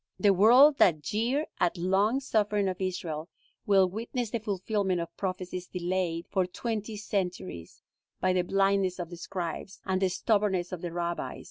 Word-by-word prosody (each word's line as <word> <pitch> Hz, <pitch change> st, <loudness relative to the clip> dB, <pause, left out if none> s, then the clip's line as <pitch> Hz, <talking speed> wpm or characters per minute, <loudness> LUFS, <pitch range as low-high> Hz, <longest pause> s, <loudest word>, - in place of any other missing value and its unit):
The 205 Hz, -2 st, +4 dB
world 250 Hz, +9 st, +7 dB
that 155 Hz, -5 st, +4 dB
jeered 240 Hz, -, 0 dB
at 175 Hz, -, +2 dB
the 170 Hz, -, -7 dB
long 200 Hz, +7 st, +2 dB
suffering 210 Hz, -5 st, +1 dB
of 185 Hz, 0 st, -3 dB
Israel, 170 Hz, -3 st, -3 dB, 0.4 s
will 195 Hz, -2 st, +5 dB
witness 230 Hz, +4 st, -4 dB
the 235 Hz, -, -1 dB
fulfillment 200 Hz, -2 st, -1 dB
of 170 Hz, -, -6 dB
prophecies 185 Hz, -1 st, -4 dB
delayed 175 Hz, -2 st, -2 dB
for 190 Hz, -3 st, +1 dB
twenty 215 Hz, +2 st, -4 dB
centuries 180 Hz, -, -4 dB, 0.4 s
by 185 Hz, 0 st, +2 dB
the 185 Hz, -, +2 dB
blindness 195 Hz, 0 st, +1 dB
of 175 Hz, -1 st, -6 dB
the 175 Hz, -, -7 dB
scribes, 180 Hz, +1 st, -5 dB
and 190 Hz, 0 st, 0 dB
the 190 Hz, -, +3 dB
stubbornness 195 Hz, -2 st, 0 dB
of 180 Hz, -2 st, -5 dB
the 175 Hz, -, -4 dB
rabbis. 170 Hz, 0 st, -3 dB
190 Hz, 165 wpm, -29 LUFS, 180-210 Hz, 0.4 s, world